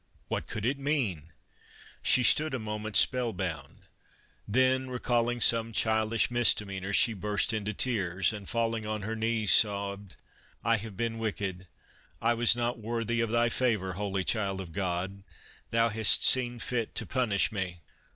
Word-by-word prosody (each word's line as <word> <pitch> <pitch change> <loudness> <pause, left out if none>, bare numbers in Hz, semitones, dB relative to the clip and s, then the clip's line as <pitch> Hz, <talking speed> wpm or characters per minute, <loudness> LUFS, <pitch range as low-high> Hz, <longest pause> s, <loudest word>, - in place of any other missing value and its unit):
What - - -3
could 110 -1 -5
it 135 +3 -1
mean? 115 - -2 0.7
She 130 - +4
stood 150 +4 +4
a - - -1
mo 105 -2 -5
ment 110 0 -6
spell 125 -3 +3
bound, 80 -7 -6 0.6
then 130 +3 +1
recalling 120 -1 -1
some 115 -1 +4
childish 110 +1 +1
mis 120 -1 +4
demeanors 100 -1 -4
she 110 +3 +4
burst 105 0 -1
into 105 -1 -2
tears, 95 -5 +1
and 105 -2 -9
falling 115 -1 -1
on 105 -1 -4
her 110 +2 -4
knees, 110 -1 0
sobbed: 100 -3 +1 0.3
" - - -32
1 115 -1 +2
have 105 -2 -10
been 115 0 -3
wicked. 95 -4 -4 0.5
I 115 +1 +2
was 120 0 +4
not 120 0 -2
worthy 115 +1 -2
of 115 - -1
Thy 120 +1 +2
favor, 110 -8 -1
Holy 100 0 -3
Child 100 -2 -1
of 90 -3 -8
God! 95 +2 -3 0.5
Thou 115 0 +2
hast 110 -1 +3
seen 120 -2 +4
fit 115 -1 -4
to - - -2
punish 120 -7 0
me." 90 -4 -5
110 Hz, 165 wpm, -28 LUFS, 100-120 Hz, 0.7 s, She